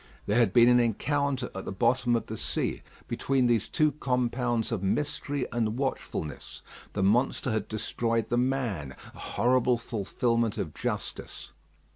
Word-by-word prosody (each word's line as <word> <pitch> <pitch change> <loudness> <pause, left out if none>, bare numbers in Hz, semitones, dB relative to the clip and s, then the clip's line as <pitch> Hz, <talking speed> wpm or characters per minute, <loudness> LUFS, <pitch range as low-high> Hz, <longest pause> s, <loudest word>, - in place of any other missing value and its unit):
There 105 +4 +2
had 115 -6 +4
been 120 +2 +6
an 125 0 +6
encounter 135 +3 0
at 95 - -6
the - - -4
bottom 120 +5 +2
of 115 - -1
the 110 - -6
sea - - -2 0.3
between 135 -2 +1
these 115 -4 +2
two 155 -1 +3
compounds 125 -4 0
of 110 -5 -1
mystery 145 +6 -1
and 115 -1 -1
watchfulness; 130 - -4 0.3
the 95 - 0
monster 120 +5 +2
had 110 -2 -1
destroyed 115 +1 -1
the 120 - +1
man: 120 - -1 0.2
a - - -14
horrible 125 0 +2
fulfilment 115 0 -1
of 80 - -3
justice. - - -5
120 Hz, 150 wpm, -28 LUFS, 110-130 Hz, 0.3 s, been